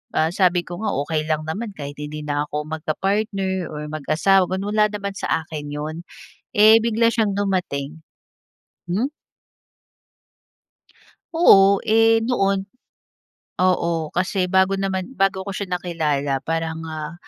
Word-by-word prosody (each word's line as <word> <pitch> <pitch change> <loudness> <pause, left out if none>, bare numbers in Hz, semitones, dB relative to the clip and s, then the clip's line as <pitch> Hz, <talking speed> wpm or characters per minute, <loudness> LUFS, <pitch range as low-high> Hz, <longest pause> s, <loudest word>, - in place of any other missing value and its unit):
ah, 160 +1 +2
sabi 180 -2 +2
ko 175 +2 -7
nga 215 - -1
okey 155 0 -2
lang 155 0 0
naman 205 +7 -4
kahit 145 -2 -7
hindi 150 +1 -6
na 145 0 -2
ako 150 0 -3
mag 160 0 -6
ka-partner 195 0 -1
or 150 0 -6
mag-asawa 160 +5 +2
wal 190 +1 -2
wala 215 0 +4
naman 200 -1 -4
sa 160 - -1
akin 150 -3 -7
'yon. 150 +2 -4 0.6
Eh, 215 +2 +8
bigla 230 0 +2
siyang 215 -4 +1
dumating. 160 -6 -2 0.9
Hmm? 245 +11 0 2.2
Oo, 200 - +6
eh, 225 +1 +5
noon. 195 -5 +1 0.9
Oo, 170 -3 +1
kasi 185 +1 0
bago 190 +1 +3
naman, 190 +1 -2
bago 195 -1 +2
ko 200 - -4
siya 185 -2 -3
nakilala 150 -6 -1
parang, 165 0 -2
ah, 155 0 -5
180 Hz, 135 wpm, -22 LUFS, 155-200 Hz, 2.2 s, Eh